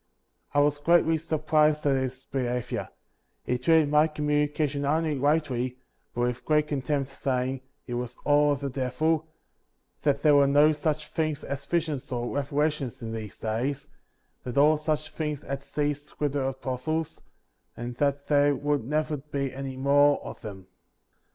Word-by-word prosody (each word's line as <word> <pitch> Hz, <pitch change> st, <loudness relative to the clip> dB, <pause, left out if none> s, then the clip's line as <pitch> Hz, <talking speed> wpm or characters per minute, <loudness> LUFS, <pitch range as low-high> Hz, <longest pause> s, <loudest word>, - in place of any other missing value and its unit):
I 145 Hz, -, +6 dB
was 145 Hz, 0 st, +2 dB
greatly 165 Hz, +1 st, +3 dB
surprised 155 Hz, -1 st, +2 dB
at 140 Hz, -1 st, +4 dB
his 130 Hz, 0 st, -3 dB
behavior; 125 Hz, -2 st, -2 dB, 0.5 s
he 125 Hz, -, -1 dB
treated 155 Hz, +2 st, +4 dB
my 150 Hz, +1 st, +5 dB
communication 150 Hz, -1 st, 0 dB
not 145 Hz, +2 st, +2 dB
only 160 Hz, -2 st, 0 dB
lightly, 135 Hz, -3 st, 0 dB, 0.4 s
but 120 Hz, -, -1 dB
with 125 Hz, 0 st, -1 dB
great 150 Hz, -1 st, +2 dB
contempt, 140 Hz, 0 st, -1 dB
saying, 130 Hz, -1 st, -1 dB, 0.2 s
it 120 Hz, -, -6 dB
was 125 Hz, 0 st, -4 dB
all 145 Hz, 0 st, +4 dB
of 140 Hz, -, -5 dB
the 140 Hz, -, -2 dB
devil, 155 Hz, +5 st, 0 dB, 0.7 s
that 140 Hz, -2 st, +1 dB
there 150 Hz, -2 st, +6 dB
were 140 Hz, -1 st, +6 dB
no 145 Hz, +2 st, +5 dB
such 155 Hz, 0 st, -2 dB
things 155 Hz, -3 st, -1 dB
as 140 Hz, 0 st, -5 dB
visions 155 Hz, -6 st, -1 dB
or 120 Hz, 0 st, -2 dB
revelations 145 Hz, -2 st, -1 dB
in 110 Hz, -, -4 dB
these 110 Hz, -3 st, -6 dB
days; 120 Hz, +6 st, -2 dB, 0.5 s
that 125 Hz, +1 st, -5 dB
all 150 Hz, +2 st, +6 dB
such 155 Hz, 0 st, -2 dB
things 150 Hz, -2 st, -3 dB
had 140 Hz, 0 st, -4 dB
ceased 145 Hz, 0 st, -3 dB
with 145 Hz, -2 st, 0 dB
the 135 Hz, -2 st, 0 dB
apos 130 Hz, -1 st, -5 dB
tles, 160 Hz, 0 st, -2 dB, 0.6 s
and 120 Hz, 0 st, -6 dB
that 140 Hz, 0 st, 0 dB
there 145 Hz, -1 st, +3 dB
would 145 Hz, -2 st, 0 dB
never 150 Hz, +4 st, -1 dB
be 140 Hz, -1 st, -4 dB
any 135 Hz, -1 st, -5 dB
more 145 Hz, +2 st, +4 dB
of -, -, -8 dB
them. 100 Hz, -4 st, -8 dB
145 Hz, 165 wpm, -27 LUFS, 130-150 Hz, 0.7 s, I